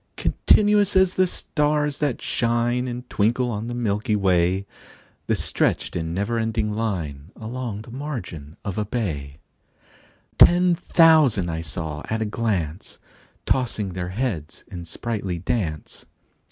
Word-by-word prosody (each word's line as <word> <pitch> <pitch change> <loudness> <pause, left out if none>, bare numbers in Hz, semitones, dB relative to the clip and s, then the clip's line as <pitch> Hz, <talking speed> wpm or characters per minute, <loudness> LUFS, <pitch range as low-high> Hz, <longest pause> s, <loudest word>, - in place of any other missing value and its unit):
Continuous 205 -1 +3
as 190 -1 +5
the 185 0 +3
stars 150 -3 0
that 145 -5 -1
shine 120 +1 +1
And 125 0 -6
twinkle 120 +4 +1
on 110 +1 -4
the 120 - -4
milky 105 -2 0
way, 95 -1 +2 0.6
The - - +2
stretched - - 0
in 80 -1 -2
never 100 +6 -1
ending 110 -1 -1
line 85 -10 -3
Along 115 -2 -5
the 115 - -12
margin 105 - -6
of 100 0 -3
a 105 - -1
bay: 80 - -3 1.0
Ten 180 0 +7
thousand 140 - +4
saw 75 -2 -4
I 110 - 0
at 110 - -2
a - - -3
glance, 100 -7 -2 0.5
Tossing 115 -6 +1
their 90 0 -4
heads 95 - -3
in 85 -1 -7
sprightly 100 -1 -3
dance. 85 -4 -2
110 Hz, 135 wpm, -23 LUFS, 90-125 Hz, 1.0 s, Ten